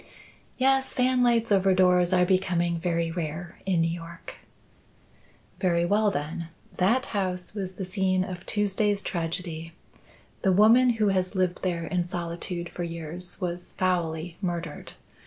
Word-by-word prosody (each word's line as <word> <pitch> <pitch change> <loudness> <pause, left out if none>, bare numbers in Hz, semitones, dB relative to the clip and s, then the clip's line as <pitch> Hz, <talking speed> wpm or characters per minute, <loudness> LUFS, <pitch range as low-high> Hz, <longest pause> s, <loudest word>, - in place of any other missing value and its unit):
"Yes. 265 0 +2
Fanlights 245 -3 +3
over 190 -1 +4
doors 180 -1 +4
are 180 -1 +4
becoming 175 -2 +1
very 170 -1 0
rare 165 0 -5
in 180 -3 +2
New 165 0 +1
York." 170 0 -8 1.2
"Very 170 -3 +2
well, 210 +3 +3
then. 165 +1 -4 0.3
That 230 +8 +3
house 185 -3 -2
was 190 -3 -4
the 190 0 -5
scene 185 0 +1
of 180 -1 -6
Tuesday's 205 -1 +1
tragedy. 165 -1 -4 0.7
The 190 - +3
woman 225 +6 +6
who 215 -2 +2
has 185 0 0
lived 185 -1 0
there 170 -3 -1
in 175 +2 0
solitude 175 0 -4
for 175 - -5
years 170 +1 -6
was 175 -1 -4
foully 170 -2 -1
murdered. 170 -4 -4
180 Hz, 140 wpm, -27 LUFS, 170-195 Hz, 1.2 s, woman